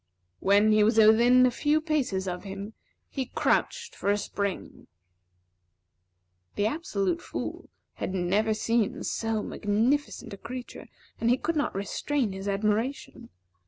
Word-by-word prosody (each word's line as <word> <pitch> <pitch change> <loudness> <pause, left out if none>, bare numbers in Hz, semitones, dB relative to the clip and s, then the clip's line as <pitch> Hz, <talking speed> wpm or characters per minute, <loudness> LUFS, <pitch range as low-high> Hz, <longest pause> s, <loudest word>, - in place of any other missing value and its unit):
When 205 +2 +4
he 215 0 +5
was 220 +2 +3
within 235 +4 +6
a 250 - +3
few 295 +5 +1
paces 280 - -1
of 180 -1 -4
him, 200 +2 -7 0.3
he 265 -3 -4
crouched - - 0
for 200 - -2
a 205 - +3
spring. 200 -1 -4 1.7
The 205 - 0
Absolute 225 - -1
Fool - - -6 0.2
had - - -4
never 200 +5 +1
seen 225 -1 0
so 225 -2 -2
magnificent 230 +6 -1
a - - -7
creature, 250 +4 -8 0.3
and 230 - +1
he 245 - +4
could 335 +5 -2
not 290 -8 -1
restrain 230 +4 -1
his 195 +1 -6
admiration. 215 +6 -2
220 Hz, 135 wpm, -27 LUFS, 200-255 Hz, 1.7 s, within